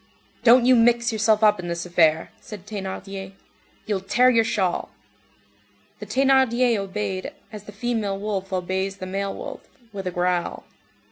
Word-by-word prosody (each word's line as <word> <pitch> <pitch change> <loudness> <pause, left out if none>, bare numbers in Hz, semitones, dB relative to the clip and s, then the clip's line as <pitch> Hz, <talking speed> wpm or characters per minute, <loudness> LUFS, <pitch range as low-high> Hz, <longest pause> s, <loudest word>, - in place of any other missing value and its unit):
"Don't 240 +1 +6
you 255 0 +6
mix 235 0 +3
yourself 215 0 +2
up 210 -2 +5
in 175 - -5
this 170 0 -3
affair," 165 -2 +2
said 205 -3 -11
Thénardier. 195 -1 -6 0.5
"You'll 205 -3 -1
tear 240 +7 +3
your 230 -2 +4
shawl." 195 -6 -1 1.1
The - - -8
Thénardier 260 -3 +3
obeyed, 195 -1 -4 0.2
as 210 -1 -9
the 205 - -10
female 215 -2 -2
wolf 195 -2 -4
obeys 190 +1 -2
the 185 - -6
male 195 +1 -3
wolf, - - -9 0.2
with 195 -2 -5
a - - -2
growl. 175 0 -1
200 Hz, 150 wpm, -23 LUFS, 190-230 Hz, 1.1 s, Don't